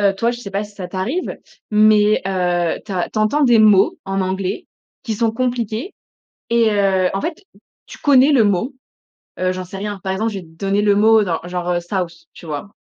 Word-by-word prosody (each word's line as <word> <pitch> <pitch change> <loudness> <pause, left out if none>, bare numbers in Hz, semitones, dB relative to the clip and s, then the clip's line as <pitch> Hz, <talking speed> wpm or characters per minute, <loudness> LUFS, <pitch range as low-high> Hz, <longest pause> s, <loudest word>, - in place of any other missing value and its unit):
heu, 200 -1 +3
toi 230 +3 +1
je 240 - -6
sais 200 - -8
pas 200 +2 -2
si 205 0 -15
ça 185 -3 -7
t'arrive, 220 - -3 0.3
mais 210 0 +5
heu, 175 -3 0
tu 200 - -7
as 180 -2 -1
tu 215 - -2
entends 250 +8 +2
des 240 -3 +5
mots 210 -3 +5
en 195 0 -2
anglais 190 0 -3 0.4
qui 225 -3 -2
sont 225 +1 +1
compliqués 240 - -3 0.6
et 230 -2 +3
heu, 190 -2 +2
en 195 - -1
fait, 355 +4 -5 0.4
tu - - -11
connais 280 0 +5
le 250 -6 +5
mot. 210 +7 0 0.6
Heu, 185 0 0
j'en 185 0 -5
sais 190 +2 -9
rien. 205 -1 -5
Par 190 - -3
exemple, 220 +3 -1
je 200 - -4
vais - - -13
te 160 - -18
donner 195 +3 0
le 205 -1 +3
mot 220 +1 +5
genr- 170 -3 -2
genre, 180 0 -3
heu: 175 - +1
South 175 -1 -3 0.2
tu 170 - -13
vois? 150 +4 -5
200 Hz, 220 wpm, -19 LUFS, 185-225 Hz, 0.6 s, mais